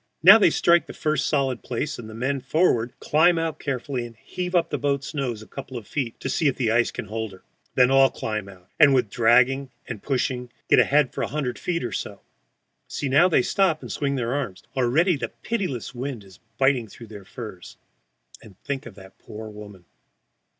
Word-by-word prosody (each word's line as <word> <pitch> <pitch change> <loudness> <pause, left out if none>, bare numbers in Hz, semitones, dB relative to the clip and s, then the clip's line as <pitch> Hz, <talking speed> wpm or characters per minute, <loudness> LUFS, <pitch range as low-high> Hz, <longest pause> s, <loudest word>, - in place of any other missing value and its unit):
Now 195 +6 +10
they 200 - +6
strike 170 +2 +3
the - - -8
first 155 -1 -1
solid 135 -5 0
place, 135 +4 -4
and 110 -2 -8
the 110 - -9
men 135 +3 -1
forward 125 -4 +1
climb 170 +3 +3
out 165 -1 -2
carefully 130 -2 -3
and 120 -1 -10
heave 180 +10 -5
up 175 - +2
the - - -1
boat's 140 0 -1
nose 125 -7 -3
a - - -16
couple 130 -2 -8
of 115 - -8
feet 130 -6 -3
to - - -3
see 150 +4 +1
if 135 - +1
the 115 -4 0
ice 120 +1 +2
will - - -4
hold 110 0 -5
her. 95 - -16 0.3
Then 125 0 +5
all 135 0 +6
climb 110 -3 -4
out, 90 -2 -16
and 145 -4 +7
with 120 -6 +1
dragging 125 +4 +3 0.2
and 115 -5 -6
pushing 125 -2 -2 0.2
get - - +6
ahead 145 -2 +3
for - - -4
a - - 0
hundred 130 -3 -3
feet 170 -4 -2
or 120 - -3
so. - - -5 0.7
See, 140 - -3
now 150 +7 +5
they 155 - +3
stop 180 -2 +1
and - - -7
swing 140 -1 -1
their 120 -1 -1
arms! 105 -10 -4
Already 145 +7 +2
the - - -4
pitiless 185 - -3
wind 125 -3 -5
is 95 -2 -17 0.2
biting 135 -4 +2
through 115 +3 -12
their 105 -2 -11
furs. 105 -5 -10 0.6
And 100 -4 -16
think 140 -2 -4
of 110 - -12
that 95 -1 -15
poor 110 +1 -9
woman! 105 -4 -12
130 Hz, 210 wpm, -24 LUFS, 115-145 Hz, 0.7 s, Now